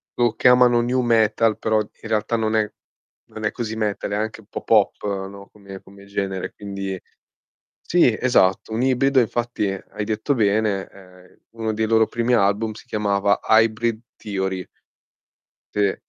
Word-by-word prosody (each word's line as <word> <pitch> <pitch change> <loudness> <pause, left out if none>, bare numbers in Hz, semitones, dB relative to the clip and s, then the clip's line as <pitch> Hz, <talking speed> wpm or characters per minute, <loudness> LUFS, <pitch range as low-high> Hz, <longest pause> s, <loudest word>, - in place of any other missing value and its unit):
lo 120 -2 +2
chiamano 125 -1 +5
"nu 125 +2 0
metal", 115 -2 +2
però 110 -1 +1
in 105 +1 -7
realtà 110 +1 0
non 110 -1 0
è 105 -1 +1 0.6
non 110 0 -6
è - - +1
così 110 -2 -5
metal, 105 -2 -2
anche 110 +2 -3
un 100 - -24
po' - - -6
pop, 105 -2 +2 0.2
no, 100 0 -12
come 100 -2 -11
come 100 0 -16
genere, 100 -2 -3
quindi 100 -2 -5 0.8
sì 145 -11 +2
esatto, 110 -4 +2
un 115 - -1
ibrido, 135 +1 +3
infatti 120 -2 -1
hai 95 +2 -6
detto 110 +6 -1
bene, 105 -2 +1
ehm, 90 -1 -18
uno 110 -1 -3
dei 110 +1 0
loro 110 0 +3
primi 120 +1 -1
album 110 0 +2
si 110 - -14
chiamava 100 -3 +1
"Hybrid 110 0 +2 0.2
Theory". 95 -3 -3 1.1
Sì, 100 -2 +2
110 Hz, 155 wpm, -22 LUFS, 100-115 Hz, 1.1 s, chiamano